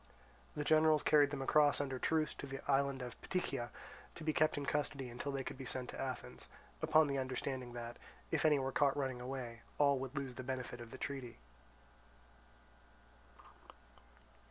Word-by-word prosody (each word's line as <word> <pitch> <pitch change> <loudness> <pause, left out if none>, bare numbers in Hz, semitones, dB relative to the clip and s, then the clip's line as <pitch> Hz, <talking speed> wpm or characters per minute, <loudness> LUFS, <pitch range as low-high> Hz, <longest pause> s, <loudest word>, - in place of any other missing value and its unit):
The 150 - -1
generals 155 0 +5
carried 145 -2 +6
them 140 -2 -3
across 145 +1 +4
under 135 -2 -2
truce 155 +2 +1
to 140 - -7
the 135 0 -5
island 140 -1 +2
of 125 -1 -8
Ptychia, 150 -9 -2 0.5
to 165 - -8
be 155 0 +1
kept 155 0 +3
in 145 - -2
custody 140 -2 -1
until 120 +4 -4
they 135 -1 -2
could 130 - -6
be - - -5
sent 125 -1 -4
to - - -6
Athens, 130 -1 -5 0.3
upon 155 0 +5
the 140 -1 0
understanding 130 -1 -3
that, 120 0 -6 0.3
if - - +1
any 155 -2 +5
were 135 -1 -1
caught 140 0 +3
running 130 -3 -1
away, 125 -2 -5 0.2
all 140 -2 +4
would 135 +2 -5
lose 135 -2 -2
the 125 - -6
benefit 125 -1 -4
of 120 - -8
the 130 - -8
treaty. 135 -4 -5
135 Hz, 175 wpm, -37 LUFS, 130-145 Hz, 0.5 s, carried